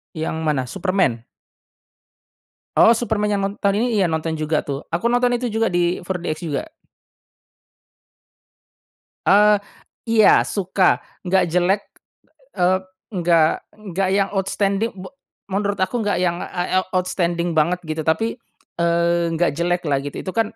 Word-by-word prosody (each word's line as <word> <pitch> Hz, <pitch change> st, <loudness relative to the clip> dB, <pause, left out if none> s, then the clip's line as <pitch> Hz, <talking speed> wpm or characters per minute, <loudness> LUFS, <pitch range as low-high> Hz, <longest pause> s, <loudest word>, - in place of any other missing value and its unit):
Yang 160 Hz, 0 st, -3 dB
mana, 145 Hz, -4 st, +1 dB
Superman? 180 Hz, -10 st, 0 dB, 1.5 s
Oh 230 Hz, +1 st, +6 dB
Superman 215 Hz, -2 st, -1 dB
yang 195 Hz, -, -1 dB
non 195 Hz, +1 st, -1 dB
tahun 200 Hz, +3 st, +1 dB
ini 230 Hz, -4 st, +1 dB
iya 185 Hz, -, +3 dB
nonton 160 Hz, 0 st, -2 dB
juga 155 Hz, 0 st, 0 dB
tuh, 140 Hz, 0 st, -5 dB
aku 180 Hz, +8 st, -1 dB
nonton 245 Hz, 0 st, +2 dB
itu 240 Hz, -2 st, -2 dB
juga 225 Hz, +1 st, +1 dB
di 175 Hz, 0 st, 0 dB
4DX 175 Hz, -3 st, -4 dB
juga. 315 Hz, -, -3 dB, 2.6 s
Eee, 210 Hz, +1 st, +6 dB, 0.5 s
iya 220 Hz, -2 st, +6 dB
suka. 190 Hz, -1 st, +1 dB, 0.3 s
Nggak 185 Hz, 0 st, +3 dB
jelek, 185 Hz, +3 st, +2 dB, 0.7 s
eee, 185 Hz, 0 st, +2 dB, 0.3 s
nggak 170 Hz, -3 st, +3 dB, 0.4 s
nggak 190 Hz, +2 st, 0 dB
yang 195 Hz, -1 st, +2 dB
outstanding 200 Hz, +2 st, 0 dB
be 185 Hz, +4 st, -9 dB, 0.4 s
menurut 200 Hz, +1 st, 0 dB
aku 235 Hz, +6 st, -2 dB
nggak 205 Hz, -4 st, 0 dB
yang, 175 Hz, 0 st, 0 dB
ah, 180 Hz, +1 st, -1 dB
eee, -, -, -4 dB
outstanding 175 Hz, -2 st, 0 dB
banget 170 Hz, +3 st, +1 dB
gitu 155 Hz, 0 st, -3 dB
tapi, 225 Hz, +8 st, 0 dB, 0.4 s
eee, 170 Hz, 0 st, +2 dB
nggak 175 Hz, 0 st, +2 dB
jeleklah 170 Hz, -3 st, 0 dB
gitu. 145 Hz, 0 st, -6 dB
Itu 185 Hz, -, -4 dB
kan 225 Hz, 0 st, -1 dB
185 Hz, 135 wpm, -21 LUFS, 170-205 Hz, 2.6 s, Oh